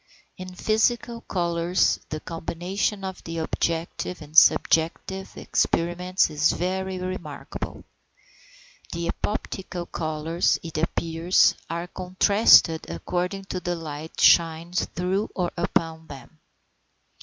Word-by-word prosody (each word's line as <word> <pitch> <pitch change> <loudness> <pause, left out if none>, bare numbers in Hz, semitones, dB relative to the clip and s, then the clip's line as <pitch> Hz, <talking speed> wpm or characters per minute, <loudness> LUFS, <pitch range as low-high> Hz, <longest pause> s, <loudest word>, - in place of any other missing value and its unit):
In 185 0 -9
physical 230 +3 0
colours 170 -2 +1
the 155 - -4
combination 175 +5 -3
of 190 -1 -6
the 165 0 -6
objective 165 +2 -2
and 150 0 -13
subjective 170 +4 +3
experiments 180 +2 +1
is 150 0 +2
very 190 +1 -2
remarkable. 180 -5 -6 1.1
The 170 0 -3
epoptical 190 -4 -4
colours, 160 +1 0
it 165 -2 -4
appears, 165 +2 +2 0.2
are 170 +1 -3
contrasted 185 -2 +4
according 180 +2 -3
as 185 - -3
the 175 0 -2
light 160 -1 -7
shines 170 +1 +4
through 185 +4 -2
or 180 -2 -1
upon 165 -2 -1
them. 145 +3 -12
175 Hz, 105 wpm, -25 LUFS, 165-185 Hz, 1.1 s, contrasted